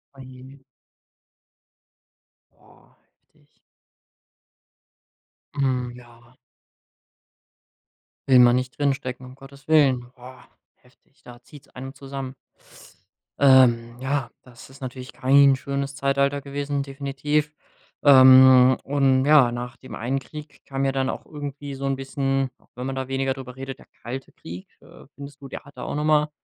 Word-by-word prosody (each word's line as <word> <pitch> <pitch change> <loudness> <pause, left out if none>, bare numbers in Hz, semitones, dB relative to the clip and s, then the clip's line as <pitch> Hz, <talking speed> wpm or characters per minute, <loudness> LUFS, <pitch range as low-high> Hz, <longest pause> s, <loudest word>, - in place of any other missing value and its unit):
Oh 135 - -12
je. 130 +1 -13 1.9
Boah, - - -25 0.4
heftig. - - -32 2.0
Mhm, 130 -3 -1
ja. 120 0 -18 1.9
Will 130 -1 +7
man 120 0 +6
nicht 130 +1 -4
drinstecken, 135 -3 -2
um 130 +1 -13
Gottes 135 +1 -16
Willen. 140 -5 +4
Boah, 130 +1 -14 0.4
heftig. 130 +2 -30
Da 120 0 -14
zieht's 145 +3 -17
einem 135 +2 -9
zusammen. 135 -1 -7 1.1
Ähm, 125 -3 +4
ja, 130 -3 -2
das 120 -1 -16
ist 135 - -17
natürlich 130 0 -8
kein 140 +1 +4
schönes 140 +1 -4
Zeitalter 140 0 0
gewesen, 140 0 -3
definitiv. 145 +2 -2 0.5
Ähm, 130 -2 +7
und 135 -1 +2
ja, 145 -5 +5
nach 120 +2 -6
dem 130 - -12
einen 125 +4 -2
Krieg 150 +3 -12
kam 135 0 -3
ja 135 - +1
dann 135 0 -1
auch - - -8
irgendwie 145 -1 -7
so 135 +1 -6
'n 135 - 0
bisschen, 135 0 -2
auch - - -31
wenn 125 +2 -5
man 135 - -4
da 130 -1 -4
weniger 135 0 -1
drüber 125 -2 -10
redet, 135 0 -7
der - - -17 0.2
Kalte 130 +3 -7
Krieg. 90 +3 -11
Äh, - - -17
findest 140 +1 -11
du, 135 - -9
der - - -8
hat 140 - -17
da - - -7
auch - - -5
noch 150 - -2
mal 150 0 +2
135 Hz, 145 wpm, -23 LUFS, 130-140 Hz, 2.0 s, Will